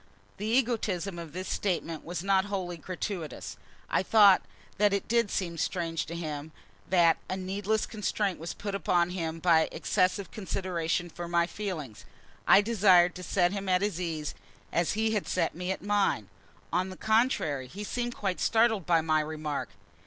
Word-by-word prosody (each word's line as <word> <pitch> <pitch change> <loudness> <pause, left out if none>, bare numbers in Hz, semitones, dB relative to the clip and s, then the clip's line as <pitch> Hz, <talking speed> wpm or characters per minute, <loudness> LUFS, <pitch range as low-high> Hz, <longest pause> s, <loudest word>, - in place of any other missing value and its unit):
The 210 - -4
egotism 220 -7 0
of 165 -3 -8
this 185 +4 -5
speech 190 -4 0 0.2
was 175 0 -5
not 195 0 +3
wholly 190 -3 -3
gratuitous. 180 0 -5 0.3
I - - +1
thought 200 -1 +6 0.4
it 200 -1 +2
did 235 -2 +2
seem 170 -4 -2
strange 165 -1 -1
to 170 - -6
him: 155 -2 -5 0.4
that 170 -3 +5
a 185 - -2
needless 200 +3 -1
constraint 205 -2 -2
was 165 +1 -5
put 200 -1 -5
upon 180 -3 +1
him 165 -3 -3
by 165 -1 +3
excessive 185 0 0
consideration 175 -4 -2
for 175 +1 -7
my 170 0 +2
feelings. 170 - -6 0.4
I 200 - +8
desired 190 -5 +5
to 180 - -8
set 175 0 +2
him 200 -1 -3
at 185 +1 +3
his 195 -4 -1
ease 160 -4 -3 0.4
as 170 0 +1
he 220 +1 +1
had 210 -3 -1
set 170 -3 0
me 180 +2 -3
at 190 - -4
mine. 200 - +1 0.4
On 180 +2 +1
the 185 - -9
contrary, 220 - +1
he 200 +11 -7
seemed 240 +3 -3
quite 195 -3 -2
startled 220 -5 +2
by 170 -2 +4
my 155 -1 +2
remark. 150 -5 -3
185 Hz, 165 wpm, -29 LUFS, 170-205 Hz, 0.4 s, I